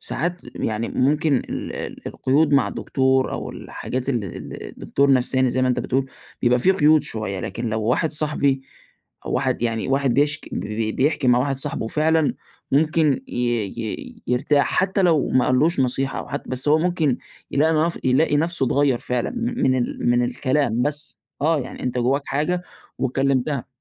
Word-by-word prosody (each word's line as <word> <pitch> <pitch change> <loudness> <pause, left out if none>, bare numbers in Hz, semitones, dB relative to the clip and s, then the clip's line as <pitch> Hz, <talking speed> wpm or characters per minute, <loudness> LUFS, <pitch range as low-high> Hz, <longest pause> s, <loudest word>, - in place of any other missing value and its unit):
ساعات 175 +4 -2 0.2
يعني 110 +1 -2
ممكن 145 +2 +2
ال - - -4
ال - - -7
القيود 145 +3 +1
مع 140 - +3
دكتور 130 -1 +1
أو - - -4
الحاجات 130 +2 -5
ال 120 -6 0
ال 90 - -8
الدكتور 140 0 +1
نفساني 130 0 +2
زي 130 +1 0
ما 130 - +3
أنت 125 - +1
بتقول، 135 +1 -1 0.3
بيبقى 125 0 +4
في 185 - +4
قيود 155 -3 +4
شوية 100 -4 -1
لكن 115 +6 -4
لو 110 0 -2
واحد 125 +8 +1
صاحبي 145 -3 +1 0.6
أو - - -3
واحد - - 0
يعني 115 0 -1
واحد 135 -2 +2
بيشك 145 +1 +1
ب - - -2
ب 110 +1 -3
بيحكي 135 -1 +1
مع 125 - +5
واحد 135 +1 0
صاحبه 135 -4 -2
فعلًا، 155 +3 +2 0.4
ممكن 155 -1 +3
ي - - -12 0.5
ي 110 - -6
يرتاح 140 +4 +2
حتى 190 +1 +1
لو 165 -5 +3
ما 130 - +2
قالّّوش 140 +4 +2
نصيحة 130 +1 -1
وح - - -4
بس 130 +3 -2
هو 155 +1 +5
ممكن 160 -6 +1 0.3
يلاقي 155 +3 +2
نف 170 - -3
يلاقي 145 +4 +3
نفسه 165 -3 +1
اتغير 135 -2 +2
فعلًا، 125 -1 -2
من 235 - +1
ال 120 0 -1
من 120 0 +3
الكلام 125 -1 0
بس 150 -4 -2 0.2
آه 155 -1 +2
يعني 130 - -8
أنت 125 0 -2
جواك 135 +4 +1
حاجة 175 +5 -1 0.4
واتكلمتها. 135 +1 0
135 Hz, 170 wpm, -22 LUFS, 125-150 Hz, 0.6 s, مع